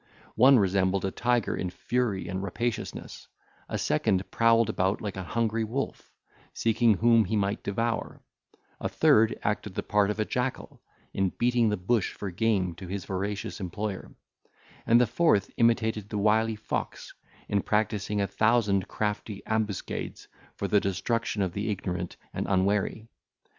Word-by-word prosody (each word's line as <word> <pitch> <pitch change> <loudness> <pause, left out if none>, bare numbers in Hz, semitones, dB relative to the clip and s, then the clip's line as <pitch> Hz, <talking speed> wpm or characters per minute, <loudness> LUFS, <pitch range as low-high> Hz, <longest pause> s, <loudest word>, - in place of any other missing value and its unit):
One 130 +4 +7
resembled 95 -1 +2
a 95 - -1
tiger 120 0 0
in 90 - -3
fury 110 +1 -1
and 95 +1 -3
rapaciousness; 105 +4 -4 0.4
a - - -2
second 95 +4 0
prowled 115 -1 +4
about 95 +3 0
like 105 -2 -5
an 95 -1 -5
hungry 115 +3 0
wolf, 125 +6 -4 0.4
seeking 115 -1 +3
whom 115 +2 +4
he 110 +4 -1
might 100 0 0
devour; 115 +3 -2 0.6
a - - -2
third 110 +1 +4
acted 105 -1 -2
the - - -2
part 105 0 +2
of 105 - -2
a 110 - +1
jackal, 125 +3 -3 0.3
in 95 -1 +1
beating 120 +2 +2
the 105 - 0
bush 100 +2 0
for 100 -2 -5
game 95 -2 +1
to 95 - -8
his 95 0 -4
voracious 100 +3 -3
employer; 100 +2 -5 0.7
and 115 +1 +6
the 125 - +5
fourth 115 - +2
imitated 110 -3 +2
the 105 - -3
wily 110 +2 +2
fox, 105 - -4 0.3
in 100 -1 +1
practising 105 -1 0
a 100 - +2
thousand 105 -1 +2
crafty 105 -1 -3
ambuscades 110 -3 -3 0.3
for - - -3
the 105 - +4
destruction 105 +2 -1
of 90 -2 -2
the 100 +3 -2
ignorant 90 -3 -3 0.2
and - - -3
unwary. 100 +3 +1
105 Hz, 155 wpm, -28 LUFS, 95-115 Hz, 0.7 s, One